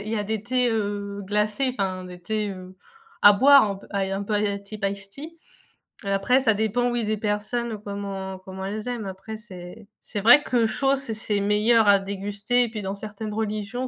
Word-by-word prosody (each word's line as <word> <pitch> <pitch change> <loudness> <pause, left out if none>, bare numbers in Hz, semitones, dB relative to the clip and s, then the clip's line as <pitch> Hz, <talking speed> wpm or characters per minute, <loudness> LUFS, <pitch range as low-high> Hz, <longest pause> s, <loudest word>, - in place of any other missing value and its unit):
il 205 - -7
y 225 - -1
a 210 - -1
des 215 0 -3
thés, 250 0 +1
heu, 205 -2 -3
glacés, 210 +6 +1
enfin 185 -2 -2
des 180 0 -10
thés, 215 +2 -2
heu, 185 -1 -10 0.5
à 205 0 +8
boire 275 +5 +7
un 200 - -3
peu - - -15
à 200 - -2
un 195 +1 -2
peu 200 - -5
à 210 - +2
la 200 -1 0
type 200 +1 -11
ice 195 -1 -9
tea. 310 +9 -9 0.7
Après 200 +7 +2
ça 225 -4 +4
dépend 220 +4 0
oui, 240 -2 0
des 215 +1 0
personnes 215 +1 -2
comment 195 -2 -5
comment 190 0 -8
elles 215 +4 -4
aiment. 240 -4 -4
Après 195 +3 -7
c'est 200 0 -11
c'est 205 - -5
vrai 240 +8 +7
que 240 -5 +2
chaud, 270 +5 +1
c'est 270 -4 -4
c'est 215 -1 -2
meilleur 210 +2 +3
à 200 -1 +6
déguster 200 +4 -1
et 240 - -2
puis 220 -2 -5
dans 195 +1 -4
certaines 210 +1 -7
religions, 220 +3 -3
210 Hz, 210 wpm, -24 LUFS, 200-225 Hz, 0.7 s, à